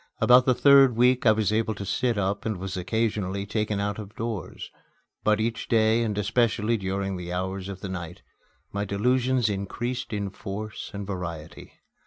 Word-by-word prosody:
About 125 +1 +6
the 130 - +4
third 135 -3 +6
week 125 +1 +3
I - - +8
was 110 -2 +1
able 110 0 0
to 100 - -6
sit 120 +3 0
up 100 +1 -1
and 110 -3 -2
was 95 +1 -5
occasionally 100 0 -1
taken 105 0 -1
out 100 +1 -2
of 105 0 -9
doors 110 -6 -5 0.5
But 105 0 +3
each 115 +1 -2
day, 110 0 +3
and 105 -3 -1
especially 110 +1 +1
during 95 -1 -2
the 90 -1 -6
hours 95 +1 -3
of 95 -1 -7
the 95 - -5
night, 90 -2 -7 0.5
my 100 0 -2
delusions 125 +4 +1
increased 120 +5 -3
in 100 -2 -3
force 105 +2 -6
and 100 0 -6
variety. 85 -5 -7
105 Hz, 175 wpm, -26 LUFS, 95-115 Hz, 0.5 s, I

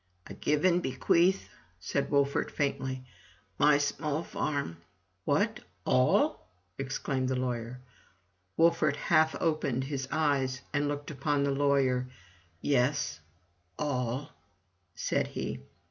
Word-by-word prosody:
" 90 - -41
I - - -8
give 150 +3 0
and 180 -1 +4
bequeath," 175 +6 +2 0.3
said 140 +9 -1
Wolfert, 140 -1 +2
faintly, 130 -2 -2 0.5
"my 145 0 +6
small 150 +2 -1
farm" 140 - -2 0.5
"What - - +1
— - - -40
all!" 65 +7 +3 0.3
exclaimed 135 -1 -1
the 130 - +1
lawyer. 125 -1 -3 0.8
Wolfert 165 -3 +4
half 160 0 +3
opened 155 -6 0
his 135 -1 -3
eyes 135 -4 +1
and 145 0 +1
looked 145 +1 -4
upon 145 0 0
the 140 - +1
lawyer. 135 -2 +2 0.6
"Yes— 130 - +1 0.6
all," 135 0 -2 0.6
said - - 0
he. - - -4
140 Hz, 115 wpm, -30 LUFS, 130-150 Hz, 0.8 s, my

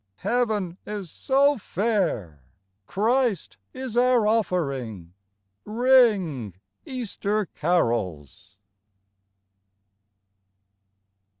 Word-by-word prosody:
Heaven 215 -7 0
is 205 -5 -6
so 280 0 +2
fair, 175 - -1 0.5
Christ 230 -1 0
is 255 -3 -6
our 245 -2 +4
offering. 140 - -1 0.5
Ring, 210 - +2 0.3
Easter 215 -4 -2
carols 115 - -2
205 Hz, 60 wpm, -25 LUFS, -, 0.5 s, our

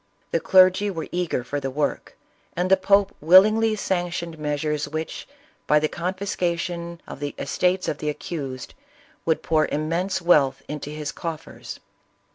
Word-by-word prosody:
The - - +2
clergy 185 +1 +5
were 165 -5 -4
eager 175 -8 -1
for 145 +4 -3
the 135 - -3
work, 145 +2 -3 0.4
and 180 +2 0
the - - +9
pope 200 +1 +3
willingly 215 +7 +6
sanctioned 175 -4 -2
measures 150 0 -1
which, 155 +1 -5 0.4
by 150 - +5
the 155 +1 +2
confiscation 170 -1 -3
of - - -9
the 145 0 -4
estate's 180 +6 0
of 150 - -2
the 150 - -2
accused, 140 -5 -5 0.5
would 160 -2 +1
jM)iir 155 -1 +2
immense 165 +6 -1
wealth 145 -7 +3
into 150 -1 -5
his 150 -1 -4
coffers. 165 -2 -7
170 Hz, 145 wpm, -24 LUFS, 150-185 Hz, 0.5 s, the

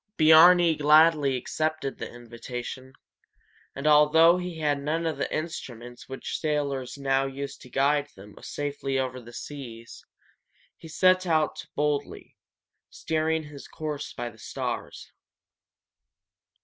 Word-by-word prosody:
Biarni 165 +1 +7
gladly 150 -2 +4
accepted 155 +2 -3
the - - -6
invitation, 120 +2 -8 0.8
and 140 - -6
although 155 +3 +6
he 180 -2 -6
had 145 -3 0
none 160 +3 -2
of 155 -4 -2
the - - -2
instruments 125 -7 -6
which 135 - -5
sailors 140 -4 -2
now 135 -1 +1
use 140 +1 -6
to 125 - -15
guide 145 +3 +1
them 100 +2 -13
safely 140 -2 -3
over 130 -1 -3
the 120 0 -13
seas, 120 -4 -9 0.7
he 165 - -13
set 185 +3 +3
out 155 -2 0
boldly, 145 -1 -2 0.5
steering 160 0 -1
his 150 -2 -11
course 150 -2 -5
by 120 - -5
the 110 - -20
stars. - - -5
145 Hz, 125 wpm, -26 LUFS, 130-155 Hz, 0.8 s, Biarni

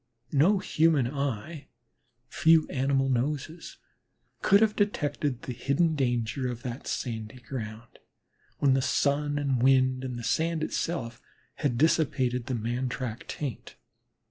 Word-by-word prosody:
No 165 +9 +4
human 160 -7 +2
eye, 140 +2 -4 0.6
few 160 +4 +4
animal 135 0 +1
noses, 140 +6 -2 0.6
could 200 +1 +5
have 220 -1 +3
detected 145 - -1
the 125 - -4
hidden 150 +7 +1
danger 120 -2 -1
of 120 -1 -6
that 125 0 -6
sandy 110 0 -4
ground, 115 -3 -8 0.6
when 140 -2 +3
the 135 - +2
sun 145 +2 +1
and 135 -4 0
wind 130 0 +3
and 125 -2 -4
the 120 - -6
sand 160 +4 0
itself 120 -10 -3 0.4
had 135 -6 0
dissipated 130 -5 +1
the 130 - -1
man 120 +3 -2
track 125 -2 -5
taint. 140 -7 -6
135 Hz, 130 wpm, -28 LUFS, 120-150 Hz, 0.6 s, could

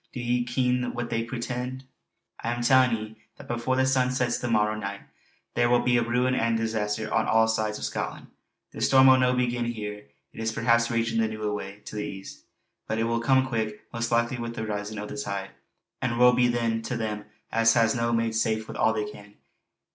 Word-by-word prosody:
Do 125 - -5
ye 120 0 0
ken 125 0 0
what 120 0 -4
they 115 0 0
portend? 125 +2 -4 0.6
I'm 120 +1 -2
tellin' 130 -1 +5
ye, 110 0 -8 0.2
that - - -12
before 120 +2 -1
the 130 0 +3
sun 130 -1 +2
sets 125 -2 0
the 125 - -3
morrow 105 -2 +2
nicht 100 -2 -5 0.5
there 120 0 +2
will 120 0 +4
be 120 -1 +3
ruin 125 +2 +1
and 115 -2 +1
disaster 110 -1 -2
on - - +2
all 110 0 +4
this 110 0 +1
side 110 -1 -1
o' - - -4
Scotland. - - -4 0.5
The - - -8
storm 130 -1 +6
will 130 -1 +7
no 125 0 +3
begin 120 -1 0
here. 105 -3 -5 0.3
It - - -11
is 115 0 -1
perhaps 115 0 +2
ragin' 115 -1 0
the 110 - +2
noo 110 0 -6
away 105 -1 -4
to - - -8
the 105 - -2
east. 95 -9 -8 0.4
But 110 - -1
it 115 - +1
will 115 0 0
come 130 +2 +3
quick, 110 -4 -3
most 115 0 -2
likely 120 +2 +1
wi' 115 0 -3
the 115 -1 -5
risin' 105 0 -4
o' 105 - -4
the 140 - -7
tide; 100 -6 -4 0.5
and 120 -3 -1
woe 125 0 +7
be 125 0 +4
then 115 -2 0
to 120 +2 -3
them 105 -2 -3 0.3
as 115 0 +4
has 115 -2 +4
no 115 0 0
made 115 -1 +1
safe 110 -1 0
wi' - - -7
all 110 - +2
they 105 -1 -1
can. 105 0 -12
115 Hz, 220 wpm, -26 LUFS, 110-125 Hz, 0.6 s, will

